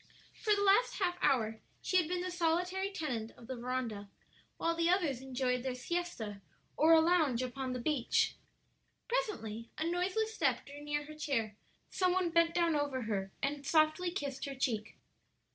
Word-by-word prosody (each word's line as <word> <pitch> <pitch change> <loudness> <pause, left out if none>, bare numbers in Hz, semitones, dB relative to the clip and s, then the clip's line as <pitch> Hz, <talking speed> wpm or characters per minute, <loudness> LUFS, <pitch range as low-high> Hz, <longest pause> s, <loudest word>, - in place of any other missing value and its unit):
For 425 -2 +2
the 405 - 0
last 405 +5 +4
half 360 -3 0
hour 225 -5 +2 0.2
she 370 - +1
had 350 -4 +3
been 355 +1 -1
the 365 0 -3
solitary 360 +3 0
tenant 250 - -3
of 235 - -13
the 260 - -5
veranda, 235 -4 -3 0.5
while 335 - +1
the 335 0 +2
others 330 -9 +2
enjoyed 255 -1 -1
their 255 0 -3
siesta 250 -9 -3 0.3
or 320 +2 +6
a 325 - +8
lounge 320 -7 +3
upon 255 0 -3
the 250 - -3
beach. 260 -1 +1 0.7
Presently 325 - -2
a 315 - -1
noiseless 380 +6 0
step - - +1
drew 285 +1 -10
near 295 0 -2
her 305 - -9
chair, 245 -9 -1 0.4
some 365 -1 +2
one 365 -2 +1
bent 335 0 +3
down 335 -2 +3
over 285 -3 -1
her 195 -3 -2
and 285 +1 -1
softly 310 +4 +3
kissed 285 -7 -4
her 275 -1 -5
cheek. 230 -5 -2
295 Hz, 175 wpm, -33 LUFS, 250-355 Hz, 0.7 s, a